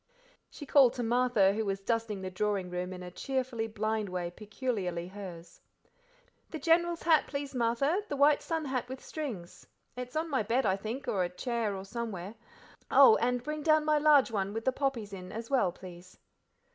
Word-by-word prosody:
She 290 - -10
called 270 -3 +5
to 245 - -3
Martha, 235 -4 +3
who 220 +2 -1
was 195 -2 -2
dusting 220 -1 -2
the 185 - -4
drawing 195 -1 -1
room 180 +1 -3
in 180 -1 -7
a 180 - -8
cheerfully 255 0 -2
blind 215 -1 -2
way 180 -1 -3
peculiarly 200 -4 -3
hers. 185 -4 -10 0.9
"The 320 - -5
General's 335 +3 +2
hat, 320 -2 +4
please, 280 -1 -5
Martha, 255 - +1
the 285 - -2
white 285 +1 +4
sun 325 -2 -2
hat 255 -2 -2
with 260 0 -6
strings; 235 - -6 0.3
it's 250 +1 -7
on 320 +2 0
my 275 -6 0
bed, 235 +5 0
I 190 -2 +3
think, 220 +7 -6
or 190 -3 +1
a 175 - -2
chair 225 +2 -2
or 190 0 -7
somewhere 210 -3 -5 0.6
oh! 265 -5 +8
and 245 +1 0
bring 305 +1 -4
down 310 0 +3
my 305 -1 +3
large 290 -4 +5
one 200 -2 -2
with 225 +1 -4
the 260 - +3
poppies 255 -7 -2
in, 185 -1 -8
as 230 +3 -7
well, 250 -10 +3
please." 180 0 -12
230 Hz, 190 wpm, -30 LUFS, 195-270 Hz, 0.9 s, oh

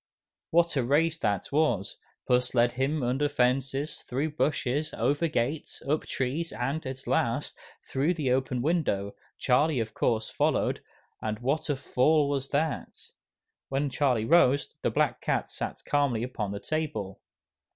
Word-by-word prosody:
What 170 0 +3
a 130 - +2
race 160 +6 +2
that 100 +1 -1
was! 140 -10 +1 0.3
Puss 125 0 +2
led 120 0 +4
him 135 +4 -1
under 135 +4 +1
fences, 135 +2 0
through 140 +5 -2
bushes, 150 0 0
over 145 +8 +1
gates, 145 0 -2
up 155 +2 0
trees, 140 +6 -2
and, 135 +6 -2
at 130 0 -6
last, - - 0 0.3
through 145 +7 +1
the 145 -6 0
open 130 -1 0
window, 135 - 0 0.2
Charlie 140 +2 +2
of 110 -1 -3
course 110 -2 0
followed, - - +1 0.4
and 110 -1 -2
what 140 +7 -1
a 145 - +2
fall 140 +3 +2
was 140 -1 -2
that! 150 +1 -2 0.6
When 140 +1 0
Charlie 125 -5 +1
rose, 140 -2 +4
the - - +1
black - - +1
cat - - -1
sat - - -5
calmly 140 -6 +1
upon 110 -5 -3
the 100 - -4
table. 150 -12 -3
135 Hz, 150 wpm, -28 LUFS, 125-150 Hz, 0.6 s, led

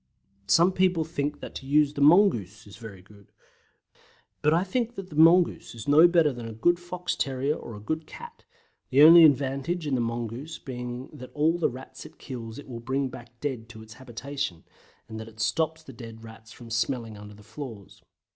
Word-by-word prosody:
Some 170 - +5
people 180 -3 +2
think 145 -2 -3
that - - -8
to 135 - -8
use 145 0 +3
THE 145 - -4
MONGOOSE 140 - +4
is 105 +1 -13
very 105 -5 -11
good, 100 0 -20 1.1
but 150 - +3
I 170 +3 +3
think 235 +4 -2
that 195 -4 -8
the - - -8
mongoose 165 -2 +4
is 115 +2 -9
no 155 +4 +7
better 165 -5 +3
than 120 -2 -7
a 115 - -7
good 175 +11 +2
fox 175 0 -4
terrier 135 +2 -1
dog - - -9
or 115 - -8
a - - -9
good 160 +8 -4
cat, 475 - -12 0.5
the 135 +3 +5
only 165 +2 +10
advantage 145 +3 +2
in 145 - -2
the 125 - +1
mongoose 120 +6 -4
being 125 0 -7
that 130 -4 -10
all 160 +3 +2
the - - +2
Rats 130 +2 -10
it - - -20
kills 115 -4 -8
it 145 - -10
will 120 -3 -7
bring 130 +3 -2
back 120 -1 -13
dead 125 -6 -4
to 110 -1 -11
its 110 0 -13
habitation, 130 - -6 0.4
and 110 -1 -8
that 110 0 -11
stops 160 +9 -1
the 135 - -12
dead 115 -1 -11
Rats 110 0 -13
from 115 -2 -12
smelling 115 -1 -2
under 105 0 -11
the 105 - -16
floors. 110 -3 -10
130 Hz, 205 wpm, -26 LUFS, 115-160 Hz, 1.1 s, only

